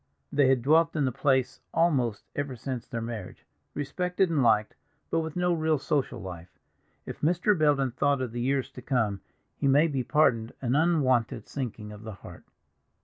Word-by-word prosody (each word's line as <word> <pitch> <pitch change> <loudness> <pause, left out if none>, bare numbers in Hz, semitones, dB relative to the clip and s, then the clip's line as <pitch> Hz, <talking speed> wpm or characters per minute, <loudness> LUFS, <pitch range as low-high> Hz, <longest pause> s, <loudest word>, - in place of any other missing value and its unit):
They 140 -2 +4
had 130 -2 +3
dwelt 160 +4 +4
in 150 -3 +1
the 130 - 0
place 130 0 +1 0.2
almost 130 -11 +2
ever 145 -2 -3
since 125 0 -5
their 115 -1 -4
marriage, 115 -5 -7 0.3
respected 180 +5 0
and 150 -4 +2
liked, 110 -3 +3 0.4
but 165 - +2
with 160 -1 -4
no 180 0 +2
real 160 -1 +1
social 135 -3 -1
life. 90 -3 -9 0.5
If - - -8
Mr. 175 +6 +2
Belden 145 -5 +2
thought 140 +3 +1
of 130 -3 -3
the 120 +1 -4
years 135 +1 0
to 125 - -10
come, 110 -7 0 0.3
he - - -1
may 145 +4 +5
be 140 -5 -1
pardoned 120 -6 +2
an 125 0 0
unwonted 130 -9 +2
sinking 115 -6 -5
of 105 0 -10
the 110 -1 -7
heart. - - -13
135 Hz, 180 wpm, -28 LUFS, 115-155 Hz, 0.5 s, may